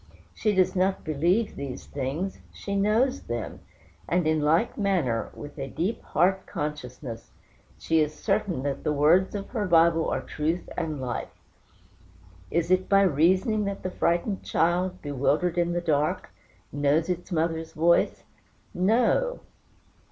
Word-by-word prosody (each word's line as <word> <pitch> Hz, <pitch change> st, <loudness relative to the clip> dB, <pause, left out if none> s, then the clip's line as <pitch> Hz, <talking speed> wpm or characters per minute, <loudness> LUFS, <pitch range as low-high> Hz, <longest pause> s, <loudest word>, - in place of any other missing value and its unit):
She 210 Hz, -2 st, 0 dB
does 185 Hz, 0 st, +3 dB
not 190 Hz, +1 st, +1 dB
believe 170 Hz, +8 st, +1 dB
these 140 Hz, -3 st, -6 dB
things 145 Hz, +8 st, -4 dB
she 200 Hz, -, -5 dB
knows 225 Hz, +7 st, +2 dB
them; 120 Hz, -1 st, -5 dB, 0.5 s
and 175 Hz, -1 st, +2 dB
in 155 Hz, -1 st, +2 dB
like 165 Hz, +9 st, +2 dB
manner, 175 Hz, -, 0 dB
with 145 Hz, 0 st, -9 dB
a 135 Hz, -, -3 dB
deep 180 Hz, -, -2 dB
heart 190 Hz, +3 st, +1 dB
consciousness, 130 Hz, -5 st, -6 dB, 0.5 s
she 160 Hz, 0 st, +1 dB
is 150 Hz, -1 st, +2 dB
certain 175 Hz, -2 st, -1 dB
that 140 Hz, -1 st, -3 dB
the 150 Hz, -, +1 dB
words 165 Hz, +8 st, +3 dB
of 200 Hz, -1 st, -5 dB
her 215 Hz, -5 st, -2 dB
Bible 165 Hz, -1 st, +4 dB
are -, -, -1 dB
truth 160 Hz, +4 st, -2 dB
and 155 Hz, -4 st, -3 dB
life. 125 Hz, -2 st, -4 dB, 1.2 s
Is 170 Hz, +1 st, 0 dB
it 185 Hz, 0 st, +2 dB
by 195 Hz, 0 st, +5 dB
reasoning 190 Hz, -, +2 dB
that 200 Hz, 0 st, -4 dB
the 185 Hz, -, -3 dB
frightened 175 Hz, +4 st, 0 dB
child, 180 Hz, +2 st, 0 dB
bewildered 150 Hz, +5 st, 0 dB
in 175 Hz, 0 st, +1 dB
the 175 Hz, -, -1 dB
dark, 150 Hz, -3 st, 0 dB, 0.4 s
knows 145 Hz, +3 st, +1 dB
its 180 Hz, +1 st, -4 dB
mother's 165 Hz, -1 st, -1 dB
voice? 170 Hz, +2 st, +2 dB, 0.5 s
No! 235 Hz, -, +2 dB
170 Hz, 145 wpm, -26 LUFS, 150-190 Hz, 1.2 s, by